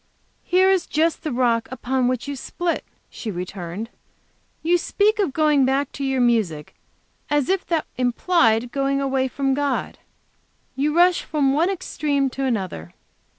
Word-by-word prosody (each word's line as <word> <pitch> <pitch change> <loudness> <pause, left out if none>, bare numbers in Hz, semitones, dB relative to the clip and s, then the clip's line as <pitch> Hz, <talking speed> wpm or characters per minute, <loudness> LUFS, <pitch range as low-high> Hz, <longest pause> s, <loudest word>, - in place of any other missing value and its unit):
"Here 370 +1 +3
is 380 -2 +1
just 320 +1 +1
the 310 -3 -3
rock 235 -2 +1
upon 260 0 -1
which 255 +1 -2
you 285 - -3
split," 340 +6 -3 0.3
she 225 - -6
returned. 180 +2 -5 0.7
"You 345 +2 +3
speak 420 +5 +1
of 385 -8 +1
going 300 -1 +3
back 270 +1 +1
to 280 - -6
your 270 -1 0
music 215 -11 0 0.6
as 295 +1 +1
if 385 0 0
that 330 -3 0
implied 245 -2 +2
going 275 0 0
away 265 -1 0
from 270 +1 -1
God. 280 -1 -2 0.8
You 295 +4 0
rush 355 0 +5
from 280 -3 +1
one 325 +6 +2
extreme 285 -7 -1
to 270 +1 -3
another. 185 - -3
275 Hz, 150 wpm, -22 LUFS, 245-315 Hz, 0.8 s, rush